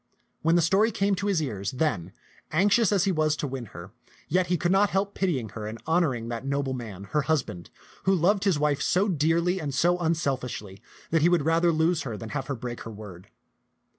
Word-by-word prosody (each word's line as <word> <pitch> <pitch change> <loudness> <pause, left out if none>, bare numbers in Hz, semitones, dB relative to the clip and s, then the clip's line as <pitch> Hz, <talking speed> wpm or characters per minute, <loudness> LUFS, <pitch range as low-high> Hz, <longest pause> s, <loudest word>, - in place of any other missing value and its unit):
When 165 +1 +3
the 175 - +4
story 195 +7 +3
came 200 -2 0
to 200 +2 -2
his 185 -6 +1
ears, 100 -8 -3
then, 125 - -1 0.4
anxious 200 +6 +3
as 195 -3 +3
he 195 - +2
was 155 -3 +1
to 150 - -3
win 135 -3 -5
her, 90 -1 -11 0.4
yet 180 +3 +2
he 180 0 +1
could 175 +2 0
not 195 +1 +4
help 200 +1 -1
pitying 145 - -1
her 105 +1 -6
and 110 +1 -7
honoring 155 -9 +1
that 115 +1 -4
noble 140 -1 -1
man, 110 -7 -7
her 150 - +2
hus 155 -2 +1
band, 90 0 -10 0.4
who 195 - +4
loved 195 +4 +2
his 190 -6 +3
wife 145 -1 +1
so 190 +3 +2
dearly 170 +2 +1
and 140 -3 -3
so 175 +4 +2
unselfishly 130 - -2 0.3
that 165 -1 +3
he 170 - +5
would 170 -5 +2
rather 165 +1 +3
lose 160 +1 +1
her 120 -6 -5
than 115 0 -7
have 135 +1 -4
her 140 - -2
break 120 0 -6
her - - -7
word. 100 -4 -11
155 Hz, 220 wpm, -26 LUFS, 125-180 Hz, 0.4 s, he